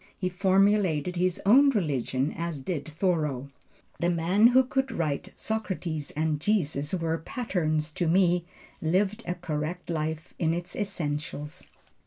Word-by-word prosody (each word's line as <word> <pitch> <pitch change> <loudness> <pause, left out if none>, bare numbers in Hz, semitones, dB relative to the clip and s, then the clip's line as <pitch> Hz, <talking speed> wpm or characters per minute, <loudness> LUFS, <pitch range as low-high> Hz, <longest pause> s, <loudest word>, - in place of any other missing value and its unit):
He 185 - -1
formulated 185 -3 +2
his 180 0 +1
own 270 +8 +7
religion 145 - 0
as 165 -4 -3
did 150 0 -3
Thoreau. 155 -5 -1 0.5
The 175 - +2
man 175 +6 +4
who 255 +2 +5
could 265 +1 -1
write, 150 -4 -2
"Socrates 185 -8 -3
and 155 -1 0
Jesus 155 -5 0
were 165 -2 -1
patterns 155 -7 -1
to 170 +2 -1
me" 175 0 +3 0.4
lived 195 +7 +1
a 180 - -1
correct 170 +1 -4
life 160 0 -3
in 165 -1 +2
its 175 0 -5
essentials. 155 -6 -4
170 Hz, 135 wpm, -27 LUFS, 155-190 Hz, 0.5 s, own